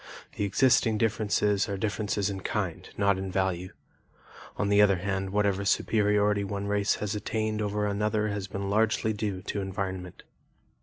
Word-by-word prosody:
The 105 Hz, -, -1 dB
existing 110 Hz, +1 st, +3 dB
differences 105 Hz, -2 st, +1 dB
are 100 Hz, -, -2 dB
differences 105 Hz, 0 st, -1 dB
in 95 Hz, -, -5 dB
kind 95 Hz, -4 st, -3 dB
not 100 Hz, -1 st, +2 dB
in 95 Hz, 0 st, -4 dB
value. 95 Hz, -1 st, -1 dB, 0.9 s
On 105 Hz, -, 0 dB
the 100 Hz, 0 st, +5 dB
other 100 Hz, -2 st, +5 dB
hand, 95 Hz, +1 st, -2 dB
whatever 100 Hz, 0 st, +1 dB
superiority 105 Hz, 0 st, +2 dB
one 100 Hz, 0 st, -4 dB
race 100 Hz, 0 st, +1 dB
has 105 Hz, 0 st, -3 dB
attained 110 Hz, 0 st, -2 dB
over 105 Hz, 0 st, -1 dB
another 105 Hz, +1 st, 0 dB
has 100 Hz, -1 st, -3 dB
been 100 Hz, 0 st, -4 dB
largely 110 Hz, +1 st, +2 dB
due 100 Hz, -3 st, -3 dB
to 100 Hz, -1 st, -3 dB
environment. 95 Hz, -2 st, -5 dB
100 Hz, 155 wpm, -28 LUFS, 95-105 Hz, 0.9 s, the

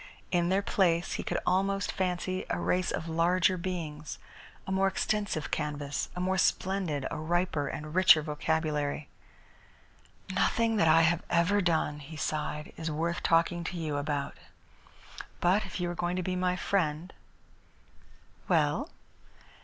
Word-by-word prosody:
In 175 Hz, -1 st, +2 dB
their 195 Hz, +2 st, +2 dB
place 175 Hz, -4 st, +1 dB
he -, -, -2 dB
could -, -, -2 dB
almost 195 Hz, +1 st, +1 dB
fancy 185 Hz, 0 st, -2 dB
a -, -, -1 dB
race 180 Hz, 0 st, +1 dB
of 165 Hz, -, -3 dB
larger 175 Hz, +3 st, +2 dB
beings, 170 Hz, -4 st, -5 dB, 0.5 s
a -, -, -5 dB
more 190 Hz, 0 st, +3 dB
extensive 205 Hz, -5 st, -1 dB
canvas, 145 Hz, -2 st, -2 dB
a -, -, -4 dB
more 185 Hz, +1 st, +1 dB
splendid, 180 Hz, -8 st, 0 dB
a 165 Hz, -, -3 dB
riper 160 Hz, -2 st, 0 dB
and 150 Hz, +2 st, -6 dB
richer 175 Hz, -4 st, +6 dB
vocabulary. 150 Hz, -1 st, -1 dB, 1.2 s
"Nothing 225 Hz, +4 st, +2 dB
that 165 Hz, -, +4 dB
I 165 Hz, +1 st, +6 dB
have 160 Hz, +1 st, +3 dB
ever 180 Hz, +4 st, +3 dB
done," 160 Hz, -4 st, 0 dB
he 150 Hz, +2 st, -10 dB
sighed, 150 Hz, 0 st, -3 dB
"is 160 Hz, 0 st, -3 dB
worth 165 Hz, +3 st, -1 dB
talking 170 Hz, +1 st, +2 dB
to 180 Hz, -, -4 dB
you 155 Hz, -3 st, -2 dB
about. 145 Hz, -1 st, -2 dB, 1.0 s
But 185 Hz, +4 st, +2 dB
if -, -, -6 dB
you 175 Hz, -, -1 dB
are 175 Hz, -, -5 dB
going 175 Hz, +1 st, 0 dB
to 185 Hz, -, -1 dB
be 185 Hz, +1 st, -2 dB
my 180 Hz, 0 st, +1 dB
friend 175 Hz, -2 st, -1 dB, 0.7 s
" -, -, -30 dB
"Well?" -, -, +2 dB
170 Hz, 150 wpm, -30 LUFS, 155-185 Hz, 1.2 s, richer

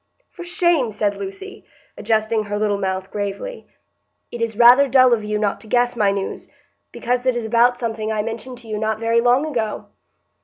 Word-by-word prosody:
'" -, -, -44 dB
"For 355 Hz, -, -8 dB
shame!" 345 Hz, -, +1 dB
said 205 Hz, -1 st, -1 dB
Lucy, 200 Hz, -, -8 dB, 0.3 s
adjusting 220 Hz, 0 st, 0 dB
her 205 Hz, 0 st, -3 dB
little 205 Hz, -1 st, 0 dB
mouth 190 Hz, -1 st, -3 dB
gravely. 205 Hz, -, -5 dB, 0.6 s
"It 240 Hz, -, -7 dB
is 225 Hz, -2 st, -2 dB
rather 245 Hz, +4 st, +7 dB
dull 255 Hz, -1 st, +5 dB
of 220 Hz, -2 st, 0 dB
you 210 Hz, 0 st, -2 dB
not 210 Hz, -1 st, -1 dB
to 220 Hz, -, -14 dB
guess 245 Hz, +2 st, +1 dB
my 210 Hz, -3 st, +2 dB
news, 195 Hz, -1 st, -4 dB, 0.4 s
because 245 Hz, +1 st, -2 dB
it 255 Hz, -, +2 dB
is 240 Hz, -2 st, -3 dB
about 240 Hz, +2 st, +3 dB
something 225 Hz, -2 st, -3 dB
I 215 Hz, -1 st, -1 dB
mentioned 230 Hz, +3 st, -6 dB
to 235 Hz, -, -16 dB
you 215 Hz, -1 st, -4 dB
not 220 Hz, 0 st, -1 dB
very 230 Hz, +1 st, +1 dB
long 245 Hz, +4 st, +3 dB
ago." 230 Hz, -8 st, -3 dB
230 Hz, 195 wpm, -20 LUFS, 210-245 Hz, 0.6 s, rather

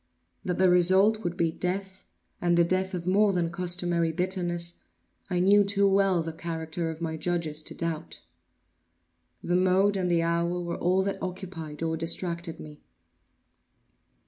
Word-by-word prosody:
That 180 Hz, -, -2 dB
the 185 Hz, -, +4 dB
result 190 Hz, +5 st, +4 dB
would 175 Hz, -1 st, -3 dB
be 165 Hz, -1 st, +1 dB
death, 190 Hz, +2 st, -4 dB, 0.3 s
and 175 Hz, -1 st, +2 dB
a 170 Hz, -, +6 dB
death 185 Hz, +2 st, -1 dB
of 175 Hz, -1 st, -5 dB
more 200 Hz, +3 st, +3 dB
than 175 Hz, -3 st, -1 dB
customary 175 Hz, -1 st, 0 dB
bitterness, 175 Hz, -1 st, -1 dB, 0.5 s
I 180 Hz, -2 st, 0 dB
knew 200 Hz, +3 st, +5 dB
too 200 Hz, 0 st, +2 dB
well 195 Hz, -3 st, +2 dB
the 165 Hz, 0 st, -5 dB
character 165 Hz, 0 st, -4 dB
of 160 Hz, 0 st, -7 dB
my 160 Hz, -1 st, -3 dB
judges 160 Hz, -3 st, -1 dB
to -, -, -8 dB
doubt. 165 Hz, -1 st, -4 dB, 1.2 s
The 175 Hz, -, 0 dB
mode 190 Hz, +2 st, +3 dB
and 180 Hz, -2 st, -1 dB
the 170 Hz, -1 st, +2 dB
hour 170 Hz, +1 st, 0 dB
were 170 Hz, -1 st, -4 dB
all 185 Hz, +2 st, +2 dB
that 200 Hz, 0 st, -3 dB
occupied 175 Hz, -5 st, -6 dB
or 160 Hz, 0 st, -1 dB
distracted 170 Hz, 0 st, -2 dB
me. 150 Hz, -1 st, -11 dB
175 Hz, 155 wpm, -27 LUFS, 170-185 Hz, 1.2 s, a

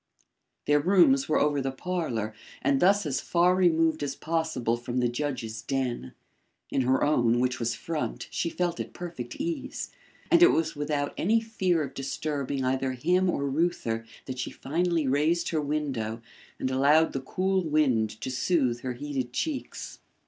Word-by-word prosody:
Their 145 Hz, 0 st, +4 dB
rooms 150 Hz, -5 st, +4 dB
were 155 Hz, -, +3 dB
over 145 Hz, -1 st, +2 dB
the 135 Hz, 0 st, -1 dB
parlour 130 Hz, -, -3 dB, 0.3 s
and 140 Hz, 0 st, +3 dB
thus 195 Hz, +3 st, +4 dB
as 135 Hz, -3 st, -1 dB
far 175 Hz, +1 st, +3 dB
removed 165 Hz, -3 st, +3 dB
as 140 Hz, -2 st, -2 dB
possible 160 Hz, -8 st, -1 dB
from 120 Hz, +1 st, -5 dB
the 125 Hz, -1 st, +3 dB
judge's 120 Hz, -4 st, -3 dB
den. 125 Hz, -, -2 dB, 0.6 s
In 135 Hz, -, +2 dB
her 130 Hz, +1 st, +2 dB
own, 120 Hz, -5 st, +3 dB
which 125 Hz, 0 st, 0 dB
was 115 Hz, -1 st, -1 dB
front, 160 Hz, -2 st, -4 dB
she 170 Hz, -, -1 dB
felt 175 Hz, 0 st, -2 dB
at -, -, -5 dB
perfect 165 Hz, -9 st, -6 dB
ease, 295 Hz, -3 st, -4 dB, 0.4 s
and 340 Hz, -, +6 dB
it 350 Hz, -, +8 dB
was 160 Hz, 0 st, 0 dB
without 145 Hz, -1 st, -1 dB
any 220 Hz, +6 st, +3 dB
fear 190 Hz, -7 st, 0 dB
of 140 Hz, -, -6 dB
disturbing 140 Hz, -1 st, -3 dB
either 130 Hz, 0 st, 0 dB
him 180 Hz, +8 st, +2 dB
or 140 Hz, -5 st, 0 dB
Reuther 135 Hz, -7 st, 0 dB, 0.2 s
that 130 Hz, -1 st, -6 dB
she -, -, -2 dB
finally 165 Hz, +2 st, 0 dB
raised 150 Hz, +6 st, +2 dB
her 160 Hz, -2 st, 0 dB
window 135 Hz, -7 st, -2 dB, 0.3 s
and 130 Hz, -, -2 dB
allowed 145 Hz, +5 st, +4 dB
the 135 Hz, -, -2 dB
cool 190 Hz, +7 st, 0 dB
wind 140 Hz, -9 st, +2 dB
to 130 Hz, -, -3 dB
soothe 130 Hz, -3 st, +1 dB
her 130 Hz, 0 st, -4 dB
heated 130 Hz, -1 st, -4 dB
cheeks. 295 Hz, -, -4 dB
145 Hz, 165 wpm, -27 LUFS, 130-170 Hz, 0.6 s, it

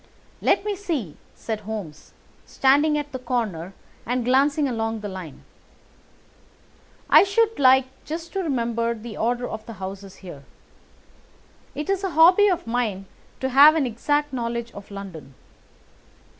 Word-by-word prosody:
"Let -, -, +2 dB
me 415 Hz, -1 st, -1 dB
see," 310 Hz, -, -4 dB, 0.2 s
said 220 Hz, -2 st, -4 dB
Holmes, 205 Hz, -8 st, -8 dB, 0.3 s
standing 290 Hz, +3 st, +3 dB
at 295 Hz, 0 st, -4 dB
the 260 Hz, -, -5 dB
corner 215 Hz, -8 st, -3 dB, 0.3 s
and 245 Hz, 0 st, -2 dB
glancing 280 Hz, +3 st, +3 dB
along 225 Hz, -3 st, -2 dB
the 210 Hz, -, -5 dB
line, 185 Hz, -7 st, -9 dB, 1.6 s
"I -, -, +8 dB
should 445 Hz, +1 st, +1 dB
like 265 Hz, -1 st, +6 dB, 0.2 s
just 330 Hz, +2 st, -6 dB
to 390 Hz, -, -2 dB
remember 235 Hz, -6 st, -1 dB
the 220 Hz, -1 st, -9 dB
order 245 Hz, +3 st, -1 dB
of 220 Hz, 0 st, -6 dB
the 230 Hz, -, -7 dB
houses 195 Hz, 0 st, -8 dB
here. 145 Hz, -6 st, -10 dB, 1.3 s
It 295 Hz, +2 st, -4 dB
is 390 Hz, 0 st, -1 dB
a 385 Hz, -, 0 dB
hobby 360 Hz, +5 st, +7 dB
of 360 Hz, -3 st, 0 dB
mine 230 Hz, -5 st, -2 dB, 0.4 s
to 265 Hz, -, 0 dB
have 285 Hz, +4 st, +7 dB
an 310 Hz, -4 st, +1 dB
exact 290 Hz, +5 st, -1 dB
knowledge 235 Hz, -1 st, -3 dB
of 200 Hz, -, -12 dB
London. 180 Hz, -9 st, -9 dB
245 Hz, 145 wpm, -23 LUFS, 210-295 Hz, 1.6 s, I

